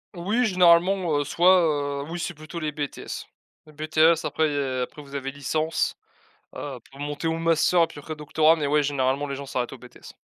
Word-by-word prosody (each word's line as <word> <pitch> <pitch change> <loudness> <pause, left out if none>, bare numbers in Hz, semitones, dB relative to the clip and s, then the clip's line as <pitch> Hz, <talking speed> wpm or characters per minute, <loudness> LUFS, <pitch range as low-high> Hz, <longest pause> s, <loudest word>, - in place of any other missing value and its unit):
Oui, 205 +8 0
généralement, 180 -3 +4
heu, - - 0
soit, 150 -4 +3
heu, - - -4
oui 170 - -4
c'est 175 - -3
plutôt 155 +2 -8
les 155 -2 -2
BTS. 145 -1 -6 0.4
Les 155 - -16
BTS 155 +2 +2
après 160 - +1
il - - -3
y - - -1
a 130 -2 -1
après 145 +4 -6
vous 140 -1 -15
avez 135 -1 -3
licence, 155 +3 -1 0.6
heu, - - -6
pour 135 - -15
monter 145 +2 -3
au 160 - -1
Master 165 +1 +3
et - - +1
puis 155 - -11
après 155 +2 -7
Doctorat, 155 +2 +3
mais 150 -2 -1
ouais, 150 +1 +3
généralement 140 0 0
les 140 -1 -4
gens 140 - -7
s'arrêtent 125 -2 -3
au 135 - -9
BTS. 125 0 -14
155 Hz, 215 wpm, -25 LUFS, 140-165 Hz, 0.6 s, généralement